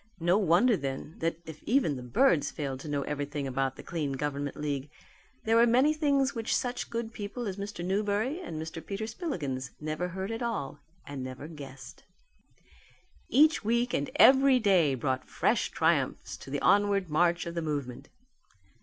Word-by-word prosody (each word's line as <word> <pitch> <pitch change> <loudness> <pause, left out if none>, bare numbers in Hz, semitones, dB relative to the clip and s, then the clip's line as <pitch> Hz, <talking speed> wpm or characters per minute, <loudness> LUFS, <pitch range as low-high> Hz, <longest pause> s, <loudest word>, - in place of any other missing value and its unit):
No 175 +2 +3
wonder, 200 +6 +4
then, 140 0 -5
that 165 -1 -1
if 160 -1 -10
even 235 - +2
the 130 - -6
birds 145 - +3
failed 135 -3 -4
to 155 - -9
know 145 -1 -1
everything 145 0 -3
about 135 0 -1
the - - -10
Clean 150 -5 -3
Government 145 0 -3
League, 145 -1 -3 0.5
there 225 +1 +2
were 235 +1 +6
many 260 +6 +4
things 280 -3 +1
which 230 -3 -1
such 245 0 -2
good 230 0 -4
people 220 +2 -5
as 190 -1 -4
Mr. 200 -3 -5
Newberry 205 - 0
and 160 - -6
Mr. 160 +1 -6
Peter 200 +2 -4
Spillikins 155 - -4
never 155 +3 -3
heard 190 +4 -4
at 225 +2 -4
all 150 - -3 0.3
and 140 -2 -6
never 130 +3 -7
guessed. 140 -4 -11 1.3
Each 310 +3 +4
week 235 +3 +1
and - - 0
every 270 -1 +7
day 185 - +3
brought 130 +1 -2
fresh - - +1
triumphs - - 0
to - - -11
the 145 +1 -2
onward 200 -4 +3
march 170 +3 +2
of 170 - -5
the 170 - -2
movement. 145 -6 -4
170 Hz, 170 wpm, -29 LUFS, 145-225 Hz, 1.3 s, every